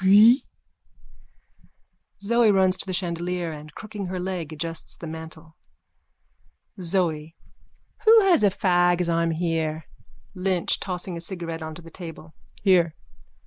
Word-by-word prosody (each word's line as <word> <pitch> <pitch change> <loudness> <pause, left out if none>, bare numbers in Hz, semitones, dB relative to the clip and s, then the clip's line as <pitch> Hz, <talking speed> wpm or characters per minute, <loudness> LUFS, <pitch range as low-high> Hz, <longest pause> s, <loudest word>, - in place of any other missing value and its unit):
Pfuiiiiiii! 215 +7 +7 1.8
(Zoe 235 +2 +3
runs 190 -2 +4
to 190 - -3
the - - -2
chandelier 175 -1 -2
and, 150 0 -10
crooking 210 -3 -6
her 185 0 -4
leg, 180 -4 -4
adjusts 165 +1 -4
the - - -8
mantle.) 160 0 -9 1.3
ZOE: 165 -3 -1 0.7
Who 445 0 +8
has 365 - +4
a 205 - +6
fag 175 -2 +2
as 175 -1 0
I'm 170 0 +1
here? 160 -1 -1 0.5
LYNCH: 185 -2 0
(Tossing 180 -1 -3
a - - -6
cigarette 170 -2 -5
on 160 0 -6
to 175 - -11
the 165 - -13
table.) 165 -3 -10 0.3
Here. 175 -5 +4
175 Hz, 135 wpm, -25 LUFS, 165-190 Hz, 1.8 s, Who